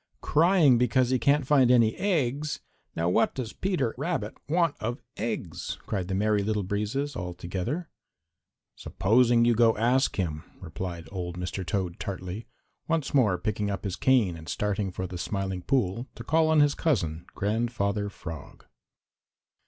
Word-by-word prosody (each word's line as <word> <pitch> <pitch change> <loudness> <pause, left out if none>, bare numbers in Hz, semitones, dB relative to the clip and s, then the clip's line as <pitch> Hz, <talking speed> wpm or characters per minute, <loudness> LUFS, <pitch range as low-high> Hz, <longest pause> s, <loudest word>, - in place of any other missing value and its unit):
"Crying 160 -6 +4
because 125 +1 +2
he 130 - +2
cannot 140 +4 +3
find 135 -3 +4
any 115 -3 +4
eggs! 150 -6 0 0.4
Now 85 +1 0
what 90 - +2
does 120 -4 -4
Peter 170 - -1
Rabbit 145 -9 -2
want 165 -1 +2
of 120 +3 -3 0.2
eggs?" 90 -7 -4
cried 95 -4 -2
the 95 - -2
Merry 105 +1 +2
Little 105 0 -1
Breezes 105 +9 -2
all 90 -5 -5
together. 95 - -3 0.9
"Supposing 115 +3 +3
you 120 - +4
go 115 -1 +4
ask 125 +5 +2
him," 80 -5 -2 0.2
replied 85 0 -6
old 90 -2 -5
Mr. 90 +1 -4
Toad 90 -2 -2
tartly, 95 +2 -5 0.4
once 165 -3 -1
more 110 -10 +4
picking 105 +2 -2
up 100 -2 -3
his 95 -3 -2
cane 120 -10 +3
and 80 0 -10
starting 105 -1 -1
for 95 +1 -4
the 90 -1 -6
Smiling 95 -1 -3
Pool 120 +1 0
to - - -8
call 160 +1 +3
on 160 -1 +5
his 145 -1 +4
cousin, 85 - -1
Grandfather 105 -1 -1
Frog. 80 -6 -9
110 Hz, 155 wpm, -27 LUFS, 95-130 Hz, 0.9 s, on